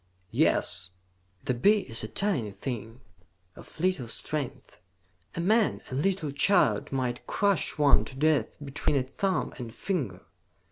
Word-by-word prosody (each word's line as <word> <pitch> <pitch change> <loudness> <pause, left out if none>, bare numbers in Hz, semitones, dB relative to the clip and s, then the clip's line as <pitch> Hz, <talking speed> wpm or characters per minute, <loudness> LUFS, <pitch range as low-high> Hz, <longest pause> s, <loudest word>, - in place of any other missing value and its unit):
"Yes." 90 0 +1 0.6
"The 125 - +1
bee 205 - +4
is 115 - -3
a - - -3
tiny 170 - 0
thing, 115 +3 -6 0.5
of - - -13
little 180 -8 +1
strength. 140 +3 -4 0.6
A - - -2
man, 215 +5 +2
a - - -4
little 155 +2 0
child, 140 - +3
might 125 -2 -2
crush 200 -6 +1
one 145 -1 +5
to 130 - -9
death 145 -4 +2
between 145 +1 -1
a 135 - +2
thumb 190 +9 -1
and 120 -2 -6
finger. 130 - -3
140 Hz, 140 wpm, -28 LUFS, 120-185 Hz, 0.6 s, one